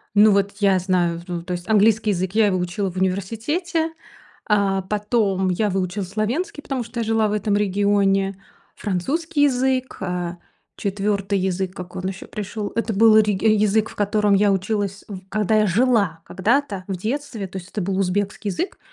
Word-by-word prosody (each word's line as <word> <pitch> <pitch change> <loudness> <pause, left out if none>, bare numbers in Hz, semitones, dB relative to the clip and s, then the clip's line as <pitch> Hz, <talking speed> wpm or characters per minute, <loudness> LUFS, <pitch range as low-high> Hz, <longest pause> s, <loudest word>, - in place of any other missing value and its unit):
Ну 210 +1 +7
вот 200 0 +2
я 195 -2 +4
знаю, 175 -2 0
в 175 - -14
ну 170 -1 -3
то 180 +1 -5
есть 175 +3 -6
английский 215 0 +4
язык, 185 0 -1
я 220 -2 +5
его 185 -2 +1
учила 180 +2 -2
в 185 - -10
университете, 245 - -1 0.5
а, 200 -2 +2
потом 205 -1 0
я 205 +4 +1
выучила 190 +1 -2
словенский, 220 - -2
потому 265 -4 -3
что 235 +1 -7
я - - 0
жила 220 -1 +2
в - - -1
этом 210 0 0
регионе, 200 -1 +2 0.4
французский 290 - -1
язык, 260 -1 +1
э, 180 -1 -3 0.4
4 200 -1 -1
язык 190 0 -1
как 180 -2 -9
он 185 0 -3
еще 190 -1 -6
пришел 210 0 -5
это 230 -1 -1
был 220 +1 +6
реги 210 -1 +1
язык, 215 0 +3
в - - -13
котором 205 0 +2
я 200 0 +4
училась 200 0 -1
в 190 -3 -7
когда 215 +1 +1
я 210 - +3
жила, 200 -5 +2
когда-то 205 0 0
в 190 - -2
детстве 225 -1 -4
то 190 - -8
есть 185 +1 -9
это 210 - -3
был 190 +1 -1
узбекский 200 +2 -1
язык, 355 - -4
205 Hz, 180 wpm, -22 LUFS, 190-220 Hz, 0.5 s, Ну